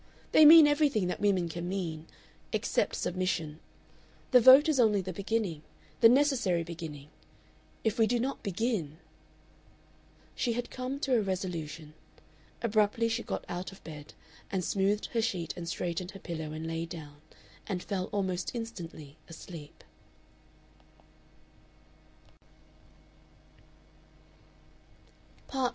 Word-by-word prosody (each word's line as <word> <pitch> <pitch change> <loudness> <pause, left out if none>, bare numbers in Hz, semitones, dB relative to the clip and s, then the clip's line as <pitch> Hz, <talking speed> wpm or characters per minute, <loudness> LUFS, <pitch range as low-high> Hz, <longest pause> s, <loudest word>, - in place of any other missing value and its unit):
They 310 - +7
mean 320 0 +10
everything 290 -8 +2
that - - -3
women 190 -4 +2
can 170 +1 -5
mean 165 -5 -4 0.4
except - - 0
submission. 175 -4 -2 0.7
The 250 -2 +7
vote 265 +6 +9
is 305 -4 +2
only 215 -4 +4
the 185 0 -6
beginning, 200 -4 -2 0.4
the 230 - +8
necessary 245 - +2
beginning. 160 -4 -8 0.7
If 220 +2 0
we 225 - +5
do 240 +2 +1
not 265 +4 -2
begin 195 - -2 0.7
" - - -31
She 240 - 0
had 240 +1 -4
come 255 +2 -4
to 270 - 0
a 230 - +3
resolution. 165 -5 -4 0.7
Abruptly 220 +1 +2
she 230 +1 -1
got - - -5
out 180 +2 -5
of 195 - -16
bed, 150 -2 -10 0.4
smoothed 195 +3 0
her 230 - +2
sheet 185 -8 -2
and 170 -2 -6
straightened 175 +1 -3
her 195 - -11
pillow 160 -4 -5
and 155 +1 -6
lay 165 +1 -3
down, 150 -3 -9 0.5
and 185 -4 -3
fell 190 -2 -2
almost 190 0 -2
instantly 165 -10 -7
asleep. 165 -2 -11
190 Hz, 120 wpm, -30 LUFS, 165-230 Hz, 0.7 s, mean